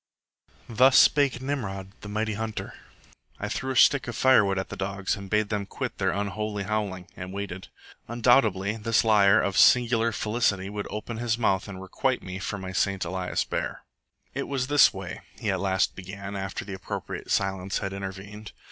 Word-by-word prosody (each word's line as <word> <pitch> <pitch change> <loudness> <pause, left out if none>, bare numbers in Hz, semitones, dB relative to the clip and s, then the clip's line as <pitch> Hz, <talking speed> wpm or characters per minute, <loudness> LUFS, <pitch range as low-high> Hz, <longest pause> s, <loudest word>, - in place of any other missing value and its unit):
Thus 130 +3 +5
spake 140 -3 +4
Nimrod, 95 -9 -4
the 105 - -8
mighty 110 +1 -1
Hunter. 110 +1 -4 0.7
I 105 - -3
threw 130 +5 -3
a - - -8
stick 135 +1 +5
of 120 - -4
firewood 105 -7 +4
at 95 - -3
the - - -6
dogs 100 +1 -2
and 100 -2 -9
bade 105 0 +1
them 105 -2 -2
quit - - -5
their - - +2
unholy 105 +1 -2
howling, 95 -3 -3
and 90 0 -7
waited. 95 -2 -6 0.4
Undoubtedly 115 -4 +2
this 115 0 +2
liar 105 -2 +5
of 100 - -1
singular 115 -2 +5
felicity 105 -3 0
would 105 -1 -4
open 110 +2 -5
his 115 -1 0
mouth 100 -4 +1
and 100 -2 -8
requite 125 +7 -1
me 95 0 -6
for 100 0 -4
my 95 -1 -6
St. 95 0 0
Elias 90 +1 -2
bear. - - -4 0.5
"It 140 - -3
was 135 -2 -1
this 145 +1 +6
way," 95 -2 -7 0.2
he - - 0
at - - -1
last 95 -1 +1
began, 95 +2 -7
after 95 0 -4
the 100 - -6
appropriate 95 - -6
silence 95 -1 0
had 95 - -3
intervened. 100 +2 -7
100 Hz, 180 wpm, -26 LUFS, 95-115 Hz, 0.7 s, this